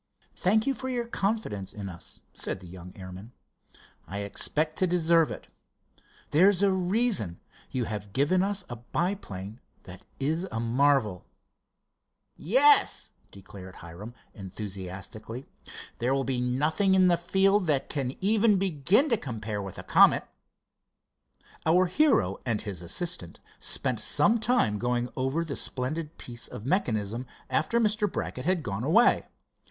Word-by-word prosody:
"Thank 215 +5 +2
you 275 - +1
for 260 0 -5
your 245 -2 -1
confidence 195 - -2
in 100 -2 -6
us," 85 -3 -8
said - - -3
the 95 - -13
young 90 0 -10
airman. 95 +4 -10 0.7
"I 100 +1 -4
expect 155 +9 0
to 185 - +3
deserve 170 -2 +3
it. - - -7 0.9
There's 190 +5 +5
a 200 - +4
reason—you 185 - -1
have 105 -2 -5
given 145 - +2
us 195 -1 +1
a 120 - -7
biplane 120 - -4 0.2
that 95 +3 -12 0.2
is 160 +7 0
a 110 - -2
marvel." 120 -4 +1 1.1
"Yes," 270 - +4 0.2
declared 95 -1 -12
Hiram, 90 +8 -10 0.2
enthusiastically, 100 +4 -7 0.5
"there 125 +3 +1
will 135 - 0
be 130 -2 -1
nothing 150 +10 +2
in 185 -1 +5
the 175 - +5
field 190 +3 +2
that 145 -3 +1
can 135 -3 -2
even 210 +1 +4
begin 190 - +2
to 230 - +3
compare 110 - -4
with 95 -2 -7
the - - -8
Comet." - - +5 1.4
Our 175 +3 +4
hero 180 - +2
and 115 -4 -1
his 95 -5 -5
assistant 175 - -3 0.2
spent - - -1
some 230 +3 +3
time 220 - +2
going 120 +1 -1
over 135 +6 -1
the 145 - -4
splendid 150 +5 -4
piece 120 -1 -4
of 105 - -9
mechanism, 120 - -1 0.2
after 200 +9 +1
Mr. 210 -2 +1
Brackett 125 - -4
had 180 -2 +1
gone 100 -1 -3
away. 180 - +4
140 Hz, 140 wpm, -28 LUFS, -, 1.4 s, There's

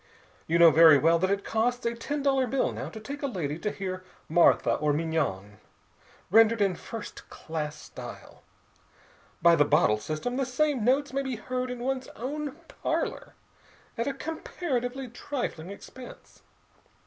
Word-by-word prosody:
You 165 - +2
know 170 -1 +8
very 160 0 +8
well 165 +3 +4
that 185 +2 +1
it 200 0 0
costs 245 +3 0
a 235 - +1
ten 280 +5 -4
dollar 270 -2 +2
bill 270 +2 0
now - - -5
to 220 - -9
take 280 +6 -7
a 280 - 0
lady 165 - -3
to 210 - -1
hear 185 -2 -5 0.2
Martha 170 +2 +4
or 150 -1 +1
Mignon, 145 -11 -2 0.7
rendered 225 +2 +6
in 195 -2 +2
first 220 +5 -9
class 155 -2 -5
style. - - -10 1.0
By 170 0 +7
the 145 - +5
bottle 145 -8 +3
system, 155 - -3
the 270 - +1
same 270 -1 +1
notes 270 +4 +2
may 275 - 0
be 265 -2 -3
heard 250 +3 -3
in 250 -1 -5
one's 260 0 -2
own 285 +4 -4
parlor - - -3 0.6
at 230 +2 -2
a 280 - 0
comparatively 270 -5 -3
trifling 240 - -5
expense. 245 +5 -12
225 Hz, 160 wpm, -28 LUFS, 165-260 Hz, 1.0 s, know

